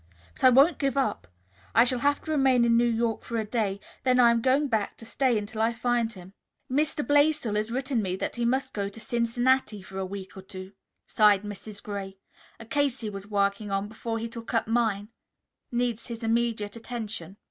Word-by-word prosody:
But - - -13
I 255 - +9
won't 275 +5 +5
give 275 -2 0
up. 240 - 0 0.5
I 230 - +8
shall 250 0 +1
have 285 +2 +1
to 315 - -4
remain 265 -5 +4
in 230 0 +4
New 240 +1 +4
York 230 -1 0
for 235 - -4
a 220 - -1
day, 210 -3 -1 0.2
then 255 -1 +3
I 240 -1 +7
am 230 0 +1
going 270 +4 +3
back 220 -5 -1
to 225 - -11
stay 245 +1 +1
until 215 +1 -4
I 225 +1 +2
find 235 -1 0
him." 185 -3 -12 0.4
"Mr. 295 +2 0
Blaisdell 290 -5 +3
has 210 +1 0
written 260 -1 0
me 185 -2 -1
that - - -3
he 240 - -2
must 260 +3 0
go 200 -1 -2
to 205 - -10
Cincinnati 235 -1 +1
for 190 0 -7
a - - -1
week 195 0 -8
or 190 - -8
two," 190 0 -9 0.3
sighed 210 -2 +4
Mrs. 205 0 -8
Gray. 195 -2 -6 0.4
"A 225 - -10
case 275 +1 0
he 215 -2 -4
was 200 0 -8
working 200 0 0
on, 195 +1 -1
before 225 +1 -4
he 225 +1 -3
took 230 0 -6
up 225 - +1
mine, 220 -3 0 0.6
needs 240 -2 -1
his 235 -1 -7
immediate 225 -2 0
attention." 215 -6 -5
230 Hz, 210 wpm, -27 LUFS, 205-245 Hz, 0.6 s, I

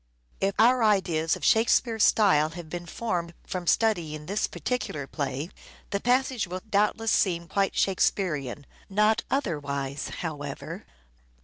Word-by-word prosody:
If 195 0 0
our 245 +2 +5
ideas 175 -7 +2
of - - -5
Shakespeare's 225 0 +3
style 155 -8 +4
have 165 -1 -9
been 175 0 -5
formed 170 -4 -3
from 180 -2 -5
studying 165 -10 +1
this 200 +6 -1
particular 200 - -3
play, 140 +3 -4 0.4
the 200 - 0
passage 250 -1 +1
will 185 +1 -6
doubtless 215 +2 +1
seem 170 -3 +1
quite 195 +1 0
Shakespearean: 150 - 0 0.2
not 210 +2 +3
otherwise,, 145 - -2
however. 145 -4 -6
185 Hz, 125 wpm, -27 LUFS, 155-215 Hz, 0.4 s, our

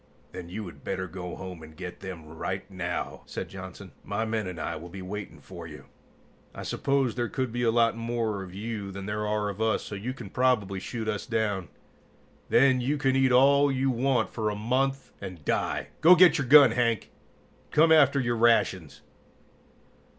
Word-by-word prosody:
"Then 90 -2 -8
you 105 +4 -5
had 85 - -11
better 95 -1 -3
go 90 0 -7
home 90 -3 -8
and 80 0 -13
get 90 0 -7
them 90 -4 -8
right 85 +4 -5
now," 90 -2 -4
said - - -6
Johnson. 95 0 -9
"My 100 +2 -2
men 110 -3 -2
and 90 -2 -6
I - - -3
will 85 +3 -9
be 95 +1 -8
waiting 100 +2 -7
for 85 -3 -10
you. 75 -2 -11 0.7
I - - -6
suppose 135 -4 0
there 120 -2 -2
could 130 -3 -2
be 120 +1 -3
a 120 - +3
lot 115 0 +3
more 115 -3 -2
of 95 -1 -8
you 105 +1 -5
than 95 0 -7
there 105 +1 -2
are 105 0 0
of 100 +2 -6
us, 110 -1 +1
so - - -8
you 115 +6 -4
can - - -9
probably 110 -7 +1
shoot 110 +3 -5
us 105 -2 -3
down. 105 -6 -1 0.8
Then 130 0 +4
you 140 +5 0
can 135 -2 +1
eat 135 -1 +3
all 140 +3 +5
you 135 0 +1
want 125 -1 +1
for 110 -2 -1
a 105 - -3
month, 135 +5 -1
and 90 -6 -8
die. - - -1
Go 175 +3 +8
get 180 -3 +6
your 135 - -2
gun, 140 -2 +8
Hank, 115 -3 0 0.6
and - - -33
come 160 +2 +4
after 140 -3 +5
your 120 -2 0
rations!" 110 -8 +2
110 Hz, 195 wpm, -27 LUFS, 95-125 Hz, 0.8 s, Go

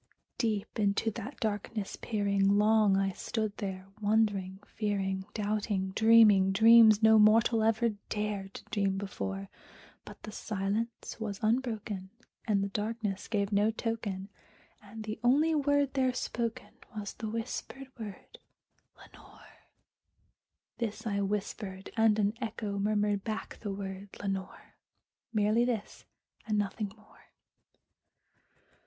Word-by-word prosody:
Deep 220 -3 -1
into 205 +2 +1
that 260 - -7
darkness 210 -1 -3
peering, 200 -2 +1
long 210 -2 +4
I 195 0 +1
stood 215 +2 -3
there 190 -3 -5 0.2
wondering, 205 -3 +1
fearing, 195 -3 -2
Doubting, 205 -2 -1
dreaming 215 -3 +6
dreams 220 +1 +7
no 220 0 +7
mortal 220 +2 +5
ever 225 +1 +2 0.2
dared 205 -2 -3
to - - -9
dream 200 -2 +1
before; 100 - -4 0.6
But - - -13
the 215 - -7
silence 215 +2 -3
was 210 -3 -4
unbroken, 215 -5 -1 0.4
and 200 -3 +2
the 200 - -2
darkness 210 -1 -3
gave 200 -2 -1
no 205 +1 +3
token, 215 -4 -3 0.5
And 215 +1 -9
the 215 0 -5
only 295 +7 +4
word 285 -2 +2
there 260 -2 +1
spoken 230 -2 -3 0.2
was 205 -1 -4
the 220 - -5
whispered 230 +4 -5
word, 210 -3 -9 0.6
"Lenore!" - - -18 1.1
This 220 -1 -3
I 200 -2 0
whispered, 195 -1 -4
and 225 -2 +4
an 205 -1 +2
echo 215 -3 -3
murmured 205 -1 +1
back 220 -1 -5
the 205 - -4
word, 195 0 -6
"Lenore!" 195 -1 -5 0.6
Merely 215 +1 +3
this 235 -4 -3 0.4
and 215 -1 +1
nothing 205 0 -2
more. 215 - -22
210 Hz, 125 wpm, -31 LUFS, 200-225 Hz, 1.1 s, dreams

